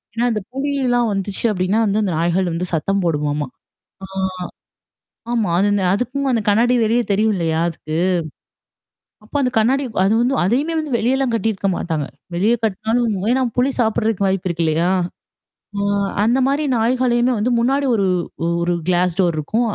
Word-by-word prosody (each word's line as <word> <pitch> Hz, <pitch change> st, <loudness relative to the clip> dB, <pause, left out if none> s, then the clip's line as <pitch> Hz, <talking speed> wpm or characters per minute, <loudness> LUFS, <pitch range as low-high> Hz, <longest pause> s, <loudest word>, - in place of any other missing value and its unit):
ஏன்னா, 235 Hz, +1 st, +1 dB
அந்த 215 Hz, -2 st, -1 dB
புலியிலாம் 265 Hz, -4 st, 0 dB
வந்துச்சு 195 Hz, 0 st, -2 dB
அப்பிடின்னா 195 Hz, +3 st, +1 dB
வந்து 205 Hz, +1 st, +1 dB
அந்த 185 Hz, -4 st, -1 dB
நாய்கள் 175 Hz, +2 st, +1 dB
வந்து 180 Hz, +2 st, -2 dB
சத்தம் 195 Hz, +4 st, 0 dB
போடுமாமாம்! 150 Hz, -3 st, -1 dB, 0.5 s
ஆ -, -, -12 dB, 1.3 s
ஆமா. 220 Hz, -6 st, 0 dB
அது 200 Hz, +2 st, +3 dB
இந்த 195 Hz, -2 st, 0 dB
அதுக்கும் 260 Hz, +5 st, -2 dB
அந்த 230 Hz, -3 st, +1 dB
கண்ணாடி 235 Hz, +4 st, +3 dB
வெளியே 235 Hz, +2 st, +2 dB
தெரியும் 215 Hz, +1 st, +2 dB
இல்லயா! 165 Hz, -2 st, 0 dB
அதுக்கு? 160 Hz, -1 st, -5 dB, 1.3 s
அப்ப 220 Hz, -, -20 dB
அந்த 250 Hz, -, +1 dB
கண்ணாடி 265 Hz, +5 st, +2 dB, 0.2 s
அது 195 Hz, -, +3 dB
வந்து 255 Hz, +3 st, +1 dB
அதையுமேல் 290 Hz, -, +1 dB
வந்து 300 Hz, -5 st, -4 dB
வெளியெல்லாம் 260 Hz, +2 st, +1 dB
கட்டியிருக்க 215 Hz, -3 st, -1 dB
மாட்டாங்க. 155 Hz, -5 st, -2 dB, 0.3 s
வெளிய 205 Hz, +7 st, +2 dB
கட்னாலும் 220 Hz, +1 st, 0 dB, 0.2 s
ஏன்னா 260 Hz, +1 st, +2 dB, 0.2 s
புலி 260 Hz, +3 st, +3 dB
சாப்படுறதுக்கு 220 Hz, -3 st, +1 dB
வாய்ப்பு 190 Hz, -1 st, -1 dB
இருக்கு 170 Hz, 0 st, -1 dB
இல்லயா! 165 Hz, +3 st, +1 dB, 0.9 s
அ -, -, -1 dB, 0.4 s
அந்தமாரி 265 Hz, +5 st, +2 dB
நாய்களையுமே 245 Hz, +1 st, +2 dB
வந்து 220 Hz, +4 st, 0 dB
முன்னாடி 275 Hz, +4 st, +1 dB
ஒரு, 200 Hz, -3 st, +1 dB, 0.6 s
ஒரு 175 Hz, +1 st, +1 dB
கிளாஸ் 180 Hz, -1 st, +1 dB
டோர் 175 Hz, -3 st, +2 dB
இருக்கும். 220 Hz, +11 st, 0 dB
215 Hz, 150 wpm, -19 LUFS, 180-245 Hz, 1.3 s, அது